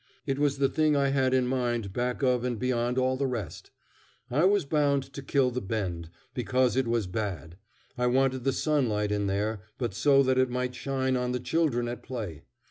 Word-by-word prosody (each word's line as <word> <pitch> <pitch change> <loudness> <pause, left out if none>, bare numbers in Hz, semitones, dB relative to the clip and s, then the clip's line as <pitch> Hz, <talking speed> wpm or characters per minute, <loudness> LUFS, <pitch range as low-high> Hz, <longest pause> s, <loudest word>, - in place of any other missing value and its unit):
It 135 -2 -1
was 145 -1 +2
the 135 0 +3
thing 155 +2 +2
I 140 -1 +2
had 135 -1 +2
in 130 -1 +3
mind 120 -5 -1
back 125 +3 -2
of 125 -2 +2
and 125 -2 -1
beyond 125 +1 0
all 130 0 +2
the 135 0 0
rest. 115 - -5 0.6
I 150 +8 +3
was 200 -3 +3
bound 140 -2 +2
to 140 - -6
kill 135 -1 +1
the 125 +1 -3
Bend, 95 -5 -3 0.2
because 125 0 +1
it 130 -2 +1
was 115 -3 +1
bad. 90 -4 -4 0.4
I 125 - +2
wanted 130 0 +2
the 135 - +2
sunlight 120 -10 0
in 105 -1 0
there, 105 +2 -1 0.2
but 120 -6 -2
so 140 +6 +4
that 130 0 +2
it 130 -1 +3
might 125 0 -2
shine 130 0 -1
on 125 0 -1
the 125 - -1
children 125 -4 0
at 120 +1 -5
play. 110 - -6
125 Hz, 205 wpm, -28 LUFS, 115-135 Hz, 0.6 s, so